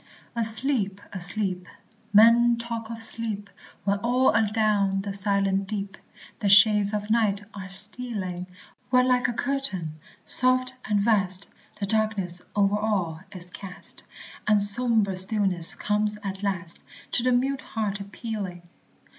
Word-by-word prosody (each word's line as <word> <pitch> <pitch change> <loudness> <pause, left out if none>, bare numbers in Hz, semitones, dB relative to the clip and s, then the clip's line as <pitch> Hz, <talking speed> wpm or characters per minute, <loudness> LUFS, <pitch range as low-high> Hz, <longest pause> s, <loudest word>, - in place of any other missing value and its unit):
Asleep! 225 -3 0
asleep! 185 -1 +2 0.4
men 230 +3 +6
talk 230 -1 -6
of 225 -1 -2
"sleep," 220 -3 -2 0.3
When 200 0 0
all 250 +4 +2
adown 210 -3 +1
the 200 0 -5
silent 195 -1 0
deep 195 -1 -4 0.4
The 205 -3 0
shades 205 0 +6
of 210 0 -3
night 210 -3 +1
are 190 -2 -8
stealing; 195 -3 -2 0.4
When 250 0 +3
like 250 0 +2
a 240 - -2
curtain, 225 - -2 0.3
soft 255 0 +3
and 210 -1 +1
vast, 200 -3 +1 0.3
The 200 - -1
darkness 200 -4 -1
over 205 0 +2
all 190 -7 -1
is 180 -2 -8
cast, 190 -1 -6 0.4
And 210 -1 +4
sombre 215 -2 +4
stillness 190 -3 +2
comes 210 0 -1
at 195 -1 -5
last, 185 -4 -4 0.3
To - - +3
the 255 +1 +1
mute 260 +2 0
heart 205 -2 -4
appealing. 200 -3 -6
205 Hz, 130 wpm, -25 LUFS, 195-230 Hz, 0.4 s, men